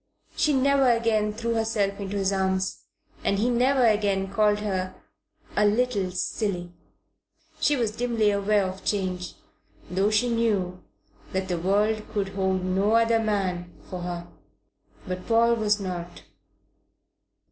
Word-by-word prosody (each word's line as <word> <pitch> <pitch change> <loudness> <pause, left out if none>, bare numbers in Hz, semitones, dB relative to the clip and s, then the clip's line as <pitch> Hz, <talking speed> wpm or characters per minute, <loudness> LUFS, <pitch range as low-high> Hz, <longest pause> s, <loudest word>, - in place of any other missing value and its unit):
She 305 - +2
never 275 -1 +3
again 225 -3 +2
threw 230 +2 -2
herself 215 -3 0
into 200 0 -4
his 195 0 +1
arms, 190 0 -1 0.4
and 200 - +1
he 235 +5 +1
never 255 +2 +3
again 200 -3 +1
called 210 0 +3
her 185 -3 -2 0.6
a 210 - +3
"little 210 -3 +1
silly." 180 -1 -2 0.9
She 295 - +3
was 235 -5 0
dimly 225 -2 +1
aware 200 0 +2
of 185 +1 -6
change, 185 -3 -2 0.6
though 195 +3 +2
she 215 +3 +2
knew 205 -6 0 0.5
that 190 0 -2
the 175 -2 -1
world 210 +4 +1
could 200 -3 -1
hold 190 -1 -1
no 195 +4 +1
other 230 0 +4
man 190 -5 -1 0.2
for 180 - -4
her. 175 -1 -5 0.8
But 185 0 -5
Paul 235 0 +4
was 215 -2 +1
not. 180 -3 -6
205 Hz, 135 wpm, -26 LUFS, 190-225 Hz, 0.9 s, other